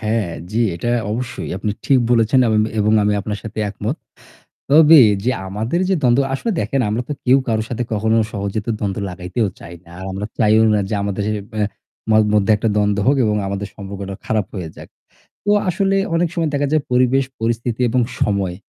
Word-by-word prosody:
হ্যাঁ, 110 -3 -1 0.2
জি, 115 +2 0
এইটা 120 +8 -2 0.2
অবশ্যই। 125 +3 -4
আপনি 105 - -2
ঠিক 135 - +4
বলেছেন 115 +2 +3
এমন 110 -1 +3 0.2
এবং 105 +1 +2
আমি 105 0 +2
আপনার 105 0 -4
সাথে 110 -1 -8
একমত। 100 - -4 0.7
তবে 155 +2 +8 0.5
আমাদের 110 - -2
যে - - +4
দ্বন্দ্ব 125 +1 +4
আসলে 230 - -2
দেখেন 135 - -1
আমরা 115 +4 -1
তো - - -2
কেউ 130 +2 +6
কারো 110 -1 +1
সাথে 125 0 -2
কখনো 110 +1 +1 0.2
সহজ 100 -1 -3
তো - - -1
দ্বন্দ্ব 100 -2 -2
লাগাইতেও 90 +5 -2
চাই 85 - -10
না। 85 - -17
আর - - -7
আমরা 100 +2 -4
চাইও 110 0 +4
না 105 - +2
যে 110 - 0
আমাদের 100 0 -2
এ - - -1 0.2
ব্যা 105 -1 0 0.5
ম - - +5 0.2
মধ্যে 105 0 +2
একটা 115 +2 -1
দ্বন্দ্ব 105 -1 +1
হোক 140 +2 +4
এবং 105 -1 +1
আমাদের 100 0 -4
সম্পর্কটা 100 -1 -7
খারাপ 110 -2 0
হয়ে 90 -5 -5
যাক। - - -11 0.6
তো 205 - +1 0.2
আসলে 195 +2 +1 0.2
অনেক 170 +1 +1
সময় 165 -3 0
দেখা 145 0 +1
যায় 155 -1 +2
পরিবেশ 130 +2 +3 0.2
পরিস্থিতি 115 +1 -2
এবং 125 +2 +2 0.2
সময় 100 -3 0
110 Hz, 195 wpm, -19 LUFS, 100-125 Hz, 0.7 s, তবে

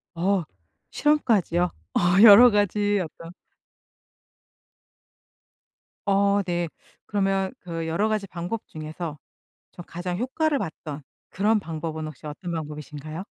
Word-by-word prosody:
어 185 +2 +1 0.5
실험까지요? 225 - +2 0.3
어 - - +2 0.2
여러 230 +3 +10
가지 205 0 +1
어떤 165 +1 -10 2.7
어 200 0 +3
네. 175 -1 -1 0.4
그러면 195 -1 0
그 165 -2 -5
여러 185 +7 +1
가지 215 -2 -1
방법 180 +5 -4
중에서 155 0 -6 0.6
좀 175 - -10
가장 175 +1 -4
효과를 285 +5 0
봤던 155 - -6 0.3
그런 210 +2 +2
방법은 160 -2 -5
혹시 155 -1 -10
어떤 170 +4 -6
방법이신가요? 155 +1 -6
180 Hz, 230 characters per minute, -25 LUFS, 160-205 Hz, 2.7 s, 여러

